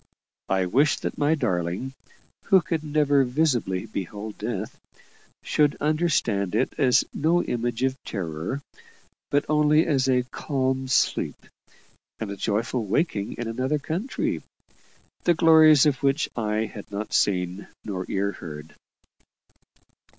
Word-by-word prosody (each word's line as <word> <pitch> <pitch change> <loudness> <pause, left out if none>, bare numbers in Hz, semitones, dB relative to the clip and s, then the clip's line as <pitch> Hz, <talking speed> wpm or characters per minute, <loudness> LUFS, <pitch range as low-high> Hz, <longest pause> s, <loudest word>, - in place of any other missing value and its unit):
I 95 -1 +2
wished 140 +11 +2
that - - -4
my 145 +2 +3
darling, 95 - -2 0.5
who 195 -1 +6
could 160 -2 -2
never 145 -2 +3
visibly 125 - 0
behold 105 +1 -6
death, 110 -1 -4 0.6
should 150 -1 +2
understand 145 - 0
it - - +1
as 130 -4 +4
no 170 +4 +2
image 120 0 -2
of 130 0 +1
terror, 90 - -4 0.7
but 145 0 +1
only 150 +1 +4
as 135 -4 +1
a 125 -1 +3
calm 130 0 -2
sleep 130 - +1 0.8
and 110 -3 -5
a - - -4
joyful 110 +4 -1
waking 105 - 0
in 120 - -5
another 130 +6 -1
country, 170 - -3 0.8
the 175 - +4
glories 160 -3 +7
of 140 -4 +1
which 140 +2 +1
eye 110 -1 0
had 105 -1 -10
not 105 +1 -5
seen 90 0 0 0.2
nor 95 -3 -4
ear 100 +1 0
heard. 75 -4 -9
125 Hz, 130 wpm, -25 LUFS, 100-150 Hz, 0.8 s, glories